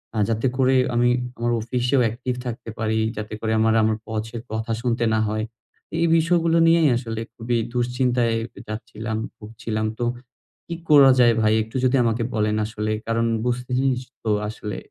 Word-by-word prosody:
আ - - -2
যাতে 115 +3 +1
করে 130 0 +3 0.2
আমি 120 +1 +3 0.3
আমার 120 0 0
অফিসেও 125 +3 0
অ্যাকটিভ 125 +3 -2
থাকতে 120 -1 -6
পারি, 110 0 0 0.2
যাতে 105 0 -5
করে 110 -1 -2
আমার, 110 0 +3
আমার, 110 0 +1
বসের 110 +1 -4
কথা 110 +1 -3
শুনতে 120 -1 0
না 110 - +2
হয়। 110 0 -1 0.5
এই 170 - +2
বিষয়গুলো 165 0 +2
নিয়েই 165 -3 +5
আসলে 115 -2 -4
খুবই 120 +1 -1 0.2
দুশ্চিন্তায় 125 -1 +1 0.3
যাচ্ছিলাম, 110 0 -5 0.2
ভুগছিলাম। 110 0 -4
তো 120 - 0 0.6
কি 170 - -4
করা 140 -3 +8
যায় 120 -1 +6
ভাই 110 0 +3
একটু 110 +3 -15
যদি 130 +1 +3
আমাকে 115 0 0
বলেন 105 0 +1
আসলে? 110 0 -3 0.2
কারণ 115 0 +1 0.2
বুঝতেছিস, 125 +1 0 0.2
তো 110 - -2 0.2
আসলে 105 -2 -6
115 Hz, 160 wpm, -23 LUFS, 110-125 Hz, 0.6 s, করা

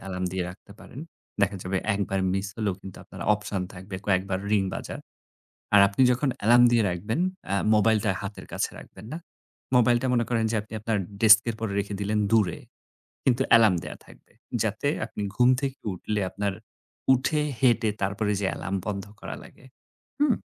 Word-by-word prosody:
alarm 90 -1 -3
দিয়ে 95 -1 -1
রাখতে 100 +2 -14
পারেন। 130 - -10 0.4
দেখা 100 0 +2
যাবে 95 +1 -2 0.2
একবার 95 -1 -1
miss 95 +1 -1
হলেও 105 -4 -1
কিন্তু 95 -2 -10
আপনার - - -12
option 105 -2 -4
থাকবে 95 +1 -8
কয়েকবার 95 -1 +1
ring 100 -2 +2
বাজার। - - -6 0.8
আর 105 - +8
আপনি 100 +6 +1
যখন 130 +3 +1 0.2
alarm 120 +2 +7
দিয়ে 115 -2 +3
রাখবেন 105 - -2 0.3
এ্যা 100 - 0 0.2
mobile-টা 110 -1 +3
হাতের 100 +1 -7
কাছে - - -1
রাখবেন 110 - -12
না। 160 - -4 0.6
mobile-টা 120 +1 +3
মনে 120 -1 +2
করেন 115 -2 +1
যে 110 - 0
আপনি 110 - -18
আপনার 110 0 0 0.2
desk 110 -1 +9
এর 115 - -1
উপর 110 -1 -3
রেখে 100 0 -2
দিলেন 105 +1 0
দূরে। 105 -7 +3 0.7
কিন্তু 130 -1 +2 0.2
alarm 110 -5 +5
দেয়া - - -7
থাকবে। - - -19 0.3
যাতে - - -1 0.2
আপনি - - -7
ঘুম 125 +2 +5
থেকে 135 -1 -3
উঠলে 105 +3 -3
আপনার 100 0 -2 0.6
উঠে 140 +4 +1 0.2
হেঁটে 120 -3 +3
তারপরে 105 +2 0
যেয়ে 95 -2 0
alarm 95 - -3
বন্ধ 100 -1 -3 0.2
করা - - -6
লাগে। - - -17 0.5
হুম? 290 -4 +4
105 Hz, 175 wpm, -26 LUFS, 100-115 Hz, 0.8 s, desk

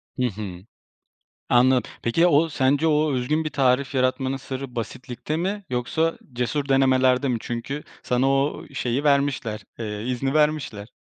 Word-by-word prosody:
Hı 125 -1 +1
hı. 95 -3 -7 0.8
Anlad 125 +1 +4 0.2
Peki, 120 +8 0
ya 175 - +6
o, 160 +3 +4
sence 140 +2 +2
o 150 -1 +2
özgün 150 +5 0
bir 155 - -2
tarif 135 0 +1
yaratmanın 130 +1 +1
sırrı 135 -1 -6
basitlikte 125 +5 -4
mi 195 +4 -2
yoksa 160 +7 0
cesur 135 +4 -2
denemelerde 130 0 +3
mi? 125 - +1
Çünkü 120 +5 -4 0.2
sana 125 +2 +1
o, 135 +2 0
eee, - - -18
şeyi 125 +4 -1
vermişler, 140 -6 +1 0.2
eee, 105 -2 -4
izni 135 +3 -1
vermişler. 150 -9 0
130 Hz, 150 wpm, -24 LUFS, 125-145 Hz, 0.8 s, ya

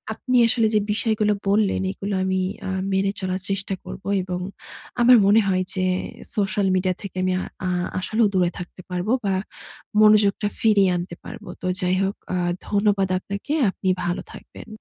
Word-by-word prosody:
আপনি 255 +2 0
আসলে 230 -1 +2
যে - - +5
বিষয়গুলো 215 -1 +1 0.2
বললেন, 205 -1 +2
এগুলো 200 +1 -5
আমি 190 0 0 0.3
আ - - -2 0.2
মেনে 195 +1 +2
চলার 185 0 -2
চেষ্টা 195 0 -1
করবো - - -8 0.2
এবং 180 -1 -4 0.6
আমার 245 +1 +8
মনে 215 +3 +6
হয় 185 -1 +1
যে 185 -1 0 0.5
সোশ্যাল 205 -1 +1
মিডিয়া 185 0 +1
থেকে 200 -3 -8
আমি 185 0 +1
আ - - -4 0.2
আ - - 0 0.3
আসলেও 215 +4 +2
দূরে 180 -2 +2
থাকতে 180 +1 -9
পারবো 180 +4 -2
বা, 195 -1 +1 0.7
মনোযোগটা 210 -1 +5
ফিরিয়ে 205 -4 +4
আনতে 175 0 -5
পারবো। - - -9
তো 185 - -3
যাই 180 0 +1
হোক, 195 +1 -1 0.2
আ - - 0 0.3
ধন্যবাদ 200 -2 +2
আপনাকে। 200 +9 -5 0.2
আপনি 190 - -3 0.2
ভালো 175 0 -1
থাকবেন। - - -12
195 Hz, 165 wpm, -23 LUFS, 185-210 Hz, 0.7 s, আমার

